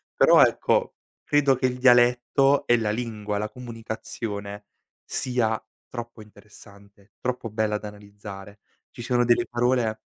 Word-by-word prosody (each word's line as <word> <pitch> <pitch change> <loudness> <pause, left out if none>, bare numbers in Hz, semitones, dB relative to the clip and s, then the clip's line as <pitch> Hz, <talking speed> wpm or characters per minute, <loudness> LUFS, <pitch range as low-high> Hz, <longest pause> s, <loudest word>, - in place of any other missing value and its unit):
Però - - +6
ecco, - - +1 0.3
credo 145 -2 +3
che 130 - -2
il 125 -1 0
dialetto 125 +2 +4
e 120 - +5
la 110 -2 -1
lingua, 105 -2 -4
la 105 +1 -3
comunicazione, 110 -4 -7 0.4
sia 120 -4 -1 0.3
troppo 120 -2 -8
interessante, 100 -1 -18
troppo 125 -2 -3
bella 110 0 -1
da 105 - -8
analizzare. 100 -1 -12 0.3
Ci - - -10
sono 120 0 +1
delle 120 0 +3
parole 120 -2 0
115 Hz, 130 wpm, -25 LUFS, 105-125 Hz, 0.4 s, Però